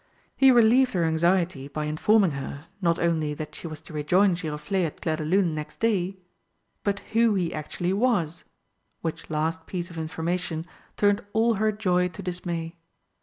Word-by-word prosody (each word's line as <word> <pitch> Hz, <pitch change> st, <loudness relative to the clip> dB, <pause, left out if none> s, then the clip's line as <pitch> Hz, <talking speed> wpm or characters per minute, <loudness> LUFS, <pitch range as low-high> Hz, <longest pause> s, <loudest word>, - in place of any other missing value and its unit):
He 270 Hz, -, +6 dB
relieved 250 Hz, +1 st, +5 dB
her 175 Hz, -3 st, +1 dB
anxiety 165 Hz, -2 st, +1 dB
by 150 Hz, +1 st, -4 dB
informing 185 Hz, +5 st, +3 dB
her, 140 Hz, +2 st, -6 dB, 0.2 s
not 170 Hz, -2 st, +2 dB
only 160 Hz, -3 st, 0 dB
that 150 Hz, 0 st, -6 dB
she -, -, -7 dB
was 155 Hz, -1 st, -7 dB
to 160 Hz, -, -12 dB
rejoin 180 Hz, +6 st, +3 dB
Giroflé 170 Hz, +3 st, -2 dB
at 150 Hz, -, -10 dB
Clairdelune 160 Hz, +3 st, +1 dB
next 150 Hz, -1 st, -6 dB
day, 195 Hz, -4 st, +1 dB, 0.7 s
but 200 Hz, -1 st, -1 dB
who 225 Hz, -1 st, +4 dB
he 175 Hz, -3 st, 0 dB
actually 175 Hz, +4 st, -2 dB
was, 195 Hz, -8 st, +1 dB, 0.6 s
which 165 Hz, 0 st, -4 dB
last 160 Hz, +1 st, -2 dB
piece 180 Hz, -1 st, -4 dB
of 165 Hz, -, -6 dB
information 165 Hz, +1 st, -2 dB, 0.3 s
turned 205 Hz, 0 st, +3 dB
all 230 Hz, +1 st, +3 dB
her 215 Hz, +1 st, +1 dB
joy 180 Hz, -4 st, +1 dB
to 180 Hz, +2 st, -9 dB
dismay. 175 Hz, -2 st, -4 dB
175 Hz, 160 wpm, -26 LUFS, 160-200 Hz, 0.7 s, He